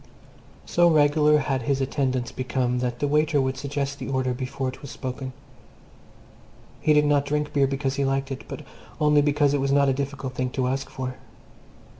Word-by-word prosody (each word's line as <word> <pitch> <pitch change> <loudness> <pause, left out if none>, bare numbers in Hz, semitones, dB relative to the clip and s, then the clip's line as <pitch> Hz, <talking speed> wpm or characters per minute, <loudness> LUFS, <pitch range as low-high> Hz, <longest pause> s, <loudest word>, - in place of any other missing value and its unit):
So 175 0 +4
regular 150 -1 +4
had 135 -2 -1
his 135 +3 0
attendance 130 -2 -1
become 125 -1 -1
that 125 -1 -2
the 145 - 0
waiter 150 +1 +2
would 130 0 0
suggest 140 0 -3
the - - -5
order 130 -2 0
before 130 +1 -3
it 130 - -10
was 140 - -8
spoken. 130 0 -5 1.5
He 155 - +2
did 150 0 +4
not 145 -1 +3
drink 150 0 -2
beer 140 -1 +3
because 135 0 -2
he 140 - +1
liked 135 0 -1
it, 135 - -6
but - - -7 0.4
only 150 -1 +4
because 145 -1 +2
it 145 - +1
was 135 0 0
not 140 0 +4
a - - +3
difficult 140 -1 -4
thing 130 0 -1
to 130 -1 +1
ask 135 +1 -2
for. 130 -1 -5
135 Hz, 190 wpm, -25 LUFS, 130-145 Hz, 1.5 s, So